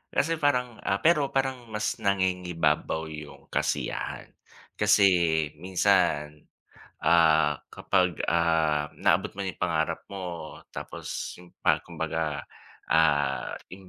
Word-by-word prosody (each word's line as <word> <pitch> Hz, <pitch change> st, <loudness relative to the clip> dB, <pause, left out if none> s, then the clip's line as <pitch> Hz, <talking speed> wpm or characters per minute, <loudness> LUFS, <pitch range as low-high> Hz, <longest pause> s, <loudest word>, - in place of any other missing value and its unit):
kasi 160 Hz, -, +2 dB
parang 125 Hz, -5 st, +1 dB
ah, 95 Hz, -, 0 dB
pero 150 Hz, -4 st, +4 dB
parang 130 Hz, -3 st, -2 dB
mas 105 Hz, +1 st, -2 dB
nangingibabaw 90 Hz, -5 st, 0 dB
yung 75 Hz, -1 st, -10 dB
kasiyahan. -, -, -2 dB, 0.5 s
Kasi 105 Hz, -1 st, +5 dB, 0.6 s
minsan, 75 Hz, -5 st, +1 dB, 0.6 s
ah, 80 Hz, -2 st, +4 dB
kapag, 90 Hz, -4 st, +1 dB
ah, 80 Hz, -3 st, +2 dB
naabot 95 Hz, +5 st, +1 dB
mo 100 Hz, -, -4 dB
yung 95 Hz, -, -5 dB
pangarap 80 Hz, -3 st, -1 dB
mo 90 Hz, -5 st, -7 dB
tapos -, -, -6 dB
yung 90 Hz, -1 st, -16 dB
pa -, -, +3 dB
kumbaga, 75 Hz, -4 st, -3 dB, 0.4 s
ah, 75 Hz, -3 st, +2 dB
ting 95 Hz, 0 st, -13 dB
90 Hz, 110 wpm, -27 LUFS, 80-100 Hz, 0.6 s, Kasi